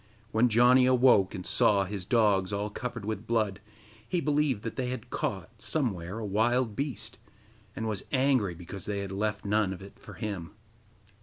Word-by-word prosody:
When 120 +2 +3
Janni 125 +3 +5
awoke, 125 -6 +4
and 90 - -6
saw 100 -2 +3
his 95 -1 -5
dogs 105 -4 +3
all 100 +1 -2
covered 120 -2 -5
with 110 +1 -4
blood, 105 -4 0 0.5
he 180 - +1
believed 145 -7 +1
that 115 - -4
they 125 -2 -2
had 125 -3 -6
caught, - - -4
somewhere, 100 - -1
a 115 - -4
wild 110 +3 +1
beast, 140 +1 -3 0.6
and 110 - -3
was 105 -3 -2
angry 130 -9 +2
because 90 +2 -8
they 100 -1 -2
had 100 -1 -5
left 105 +1 -2
none 105 -1 +2
of 95 - -7
it 100 - -13
for - - -12
him. 100 -5 -5
110 Hz, 175 wpm, -29 LUFS, 100-125 Hz, 0.6 s, Janni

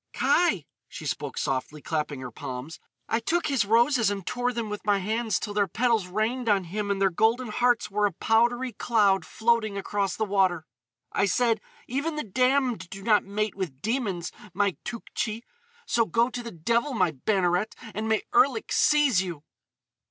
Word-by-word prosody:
"Kai!" 210 - +2 0.2
she - - -7
cried - - -4
softly, 135 +3 -2
clapping 150 -3 -3
her 125 -1 -6
palms. 130 +6 -7 0.3
"I 225 - +1
took 335 +9 0
his 270 -8 +1
roses 230 +2 +4
and 200 -3 -4
tore 245 +3 -1
them 235 -2 -3
with 210 0 -5
my 205 -1 +3
hands 220 +2 -1
till 205 - -4
their 205 -1 +2
petals 225 0 +1
rained 220 +5 -1
on 200 -2 +3
him 205 +4 -4
and 200 -1 0
their 195 -1 +3
golden 225 +6 +1
hearts 240 0 +1
were 210 +1 +2
a - - -4
powdery 240 +7 +1
cloud 205 -3 +2
floating 220 -2 +1
across 200 -1 -1
the 220 - -1
water. 190 -5 +1 0.5
"I - - +2
said: 225 +2 +2 0.3
'Even 285 +6 -2
the 300 - -2
damned 250 -1 +1
do 195 0 -9
not 210 -1 +3
mate 210 +1 -2
with 175 -9 -5
demons, 205 -7 -1 0.2
my 200 -2 +1
Tougtchi! 230 -1 -4 0.4
So 230 - +2
go 230 +8 +2
to 245 - -4
the 235 - -6
devil, 235 - 0
my 185 -6 +2
Banneret, 180 +5 0 0.2
and 220 +2 -3
may 220 -1 +1
Erlik 415 +1 +3
seize 290 -10 +4
you! 170 -6 -6
215 Hz, 175 wpm, -26 LUFS, 190-235 Hz, 0.5 s, roses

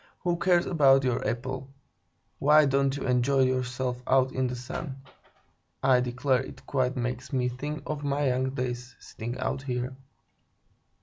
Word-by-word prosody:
"Who 175 -1 0
cares 175 -1 +3
about 135 -5 +5
your 125 -2 0
apple? 130 +2 -4 0.7
Why 150 +2 +6
don't 135 0 +1
you - - -4
enjoy 125 +2 +2
yourself 125 -1 0
out 130 0 +3
in 130 -1 0
the 125 - -4
sun? 130 +3 -6 0.9
I 130 -1 +5
declare 125 +1 +1
it - - -10
quite 130 -1 0
makes 125 +2 -3
me 125 -2 +1
think 145 +5 -5
of 150 -1 -4
my 140 0 +1
young 130 +1 0
days, 125 -2 -4
sitting 120 +3 -6
out 135 - -2
here." 125 -1 -3
130 Hz, 150 wpm, -28 LUFS, 125-140 Hz, 0.9 s, Why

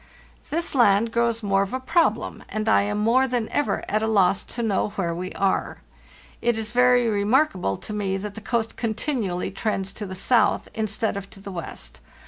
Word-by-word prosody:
"This 335 +3 -1
land 230 -3 +4
grows 235 -1 +1
more 195 -1 +2
of 195 +3 -2
a - - -2
problem, 320 +6 +1
and 215 0 -3
I 220 - +5
am 205 +1 -1
more 235 +5 +3
than 240 -3 -1
ever 290 - 0
at 215 +1 0
a 220 - 0
loss 195 -3 +3
to 235 - -4
know 210 -1 +1
where 175 -4 -1
we 180 +2 -5
are. 195 -1 -1 0.6
It 235 -1 +1
Is 220 -1 -3
very 250 0 +4
remarkable 205 - +1
to 215 - -7
me 195 -2 -1
that 205 +1 -6
the 220 - -9
coast 225 0 -2
continually 220 -5 -2
trends 195 -1 -2
to 210 - -6
the 185 - -6
south 235 +6 +2
instead 215 -1 -1
of 200 0 -7
to - - -14
the 195 0 -8
west. 170 -3 -7
215 Hz, 195 wpm, -24 LUFS, 195-235 Hz, 0.6 s, I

